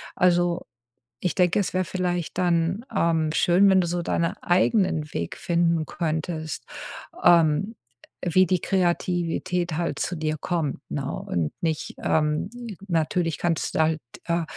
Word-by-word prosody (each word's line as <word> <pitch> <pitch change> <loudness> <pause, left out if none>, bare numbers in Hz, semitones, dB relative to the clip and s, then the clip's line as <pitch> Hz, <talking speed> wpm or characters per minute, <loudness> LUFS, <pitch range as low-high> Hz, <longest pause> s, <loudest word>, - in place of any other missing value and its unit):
Also, 175 -1 +2 0.6
ich 180 - 0
denke, 180 -2 +2
es 200 - -1
wäre 185 0 +1
vielleicht 175 -2 -2
dann, 175 +4 +1
ähm, 160 -2 +2
schön, 180 +4 +4
wenn 190 -1 +5
du 175 - -1
so 175 +1 -1
deinen 170 0 0
eigenen 175 -4 +2
Weg 85 0 -3
finden 170 -2 +1
könntest, 160 -1 -3 0.6
ähm, 170 +5 +4 0.5
wie 185 +2 +4
die 185 +1 +1
Kreativität 175 -1 0
halt 170 0 -1
zu 180 - -2
dir 155 0 -1
kommt, 165 -4 -2
ne? 140 -1 -3
Und 80 -4 -2
nicht, 160 -2 -2
ähm 150 +3 +1 0.4
natürlich 165 -1 0
kannst 165 -2 -1
du - - +1
halt, 160 -1 +2 0.2
äh, 170 0 0
170 Hz, 140 wpm, -25 LUFS, 160-180 Hz, 0.6 s, wenn